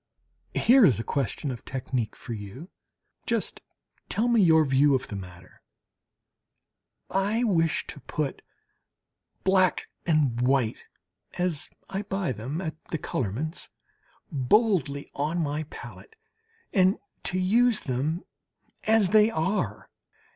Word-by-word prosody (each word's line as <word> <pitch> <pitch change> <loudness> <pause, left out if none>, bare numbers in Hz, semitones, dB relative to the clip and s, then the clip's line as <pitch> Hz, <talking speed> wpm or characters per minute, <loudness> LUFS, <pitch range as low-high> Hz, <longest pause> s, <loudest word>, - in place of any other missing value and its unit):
Here 255 +2 +6
is 125 - +5
a - - -2
question 140 +1 -2
of 120 - -7
technique 130 -3 -3
for 120 - -7
you! 110 - -8 0.6
Just - - -1 0.5
tell 225 +3 +1
me 235 -2 +4
your 160 -3 +6
view 135 +1 +4
of 130 +1 -3
the 105 - -5
matter! 90 -2 -10 1.5
I 205 +5 +1
wish 165 -8 +2
to - - -8
put 145 -1 -3 1.0
black 190 -1 +2 0.2
and 145 -7 +2
white, 125 -3 +1 0.5
as 175 -3 -1 0.2
I 195 0 -3
buy 195 -6 -2
them 130 - -4
at 160 -3 -6
the 160 - -3
colourman's, 135 - -3 0.6
boldly 145 - +2
on 150 +4 -1
my 155 -1 -1
palette, 445 - -11 0.6
and 190 +1 +4 0.3
to 185 - 0
use 225 +5 +3
them 145 +7 -2 0.6
as 220 -3 +4
they 215 +2 +6
are. 160 - -2
155 Hz, 120 wpm, -27 LUFS, 130-195 Hz, 1.5 s, Here